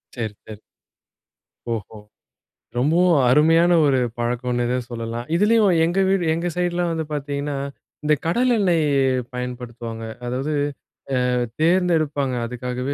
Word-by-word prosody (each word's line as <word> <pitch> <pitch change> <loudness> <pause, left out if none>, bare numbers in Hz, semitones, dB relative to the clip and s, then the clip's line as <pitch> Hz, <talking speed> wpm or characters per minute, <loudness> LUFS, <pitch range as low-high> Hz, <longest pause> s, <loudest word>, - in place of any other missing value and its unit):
சரி, 110 -3 -3
சரி. 105 -1 -10 1.1
ஓஹோ! 110 0 -6 0.8
ரொம்பவும் 165 +5 +3
அருமையான 165 +5 +5
ஒரு 135 -2 +3 0.2
பழக்கம்னே 120 +1 -1
தான் 125 -1 -2
சொல்லலாம். 115 +1 -5
இதுலயும் 210 0 +4
எங்க 175 +3 0
வீடு, 190 -2 +2
எங்க 170 +2 -2
சைடுலாம் 175 -1 0
வந்து 160 -1 -2
பார்த்தீங்கன்னா, 145 0 -3 0.5
இந்த 150 0 +3
கடல 240 +8 +2
எண்ணெய் 170 -5 +2 0.5
பயன்படுத்துவாங்க. 120 -2 -6 0.2
அதாவது 130 +5 -2 0.6
அ - - +2 0.4
தேர்ந்தெடுப்பாங்க, 160 -6 +2
அதுக்காகவே 125 +3 -4
145 Hz, 110 wpm, -22 LUFS, 125-175 Hz, 1.1 s, அருமையான